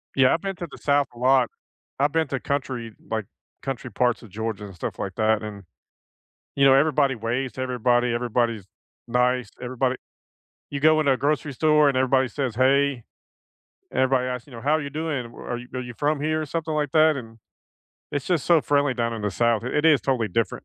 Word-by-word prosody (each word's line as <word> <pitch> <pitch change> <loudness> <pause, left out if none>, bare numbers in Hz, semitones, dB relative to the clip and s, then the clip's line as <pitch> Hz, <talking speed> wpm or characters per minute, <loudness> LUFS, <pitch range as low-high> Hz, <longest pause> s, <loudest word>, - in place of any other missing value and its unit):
Yeah, 130 -1 +5
I've 165 - -1
been 195 -1 -3
to 175 - -5
the - - -11
South 145 -1 +2
a - - -14
lot. 130 -1 +3 0.5
I've 145 +1 +2
been 160 -2 +1
to 135 - -2
country 130 -5 -3 0.2
like, 110 -2 -2 0.4
country 130 -2 -5
parts 120 +3 +1
of 115 - -12
Georgia 110 0 -4
and 95 -3 -11
stuff - - -5
like 95 -2 -3
that, 110 0 +2
and, 100 -2 -7 0.9
you 140 - +4
know, 135 - +7
everybody 140 -1 +3
waves 120 +2 -2
to 130 - -5
everybody, 125 -1 +1
everybody's 120 -3 -1 0.4
nice. 125 -1 +1
Everybody 130 +1 -1 0.8
you 140 - -3
go 155 +2 +5
in 155 - +1
a 135 - +4
grocery 145 +1 -1
store, 150 +2 +4
and 135 - 0
everybody 130 0 +3
says 125 -2 -3
hey. 135 0 +2 0.9
Everybody 130 -1 +2
asks, 125 0 -5
you 140 - -14
know, 115 - -8
"How're 155 +3 +2
you 140 - -5
doing? 150 -3 -3
W 115 0 -12
Are 120 - -3
you 125 - -10
are 130 - -3
you 125 -1 -8
from 145 0 0
here, 155 +1 0
or - - -3
something 160 +1 -3
like 150 -2 -1
that?" 155 0 +5
and 115 -3 -9 0.8
it's 145 -2 -2
just 175 -6 0
so 170 -2 +5
friendly 145 -2 +1
down 115 -1 -1
in 110 - -5
the 105 - 0
South, 115 +2 +1
i - - -2
it 150 +4 0
is 150 -5 +6
totally 120 -2 0
different. 115 +4 -2
130 Hz, 210 wpm, -24 LUFS, 120-145 Hz, 0.9 s, know